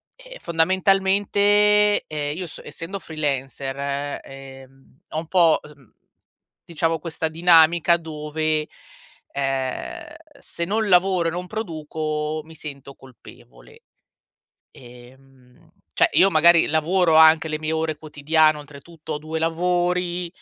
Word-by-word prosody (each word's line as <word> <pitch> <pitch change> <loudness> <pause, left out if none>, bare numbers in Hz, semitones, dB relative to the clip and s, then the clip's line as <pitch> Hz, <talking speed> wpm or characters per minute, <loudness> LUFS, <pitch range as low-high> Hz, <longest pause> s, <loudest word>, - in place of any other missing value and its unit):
ehm, - - -13
fondamentalmente, 200 +4 +2
ehm, 150 -1 -4
io 180 +2 -5
so 165 - -9
essendo 190 +4 -7
freelancer, 140 -2 -4
ehm, 135 0 -14
ho - - -4
un 160 +1 -4
po' 170 -4 +4
s 150 - -13
mhmm, 135 -6 -25 0.7
diciamo 165 -1 -1
questa 160 -1 -4
dinamica 170 0 +4
dove, 155 -1 -3 0.6
ehm, 135 -2 -4 0.2
se 170 - -5
non 215 +3 -1
lavoro 180 -2 +3
e - - -5
non 180 +2 -5
produco 155 -6 -4
mi 160 +1 -15
sento 140 -3 -10
colpevole. 60 - -17 0.9
Ehm, 125 +1 -18 0.2
cioè, - - +3
io 195 - +5
magari 170 +1 +5
lavoro 160 +2 +1
anche 160 0 +6
le 155 0 -3
mie 155 0 -3
ore 160 -1 -2
quotidiane, 155 +1 +1
oltretutto 150 +2 -11
ho - - -3
2 155 +2 -5
lavori, 175 +1 -1
160 Hz, 120 wpm, -22 LUFS, 145-175 Hz, 0.9 s, anche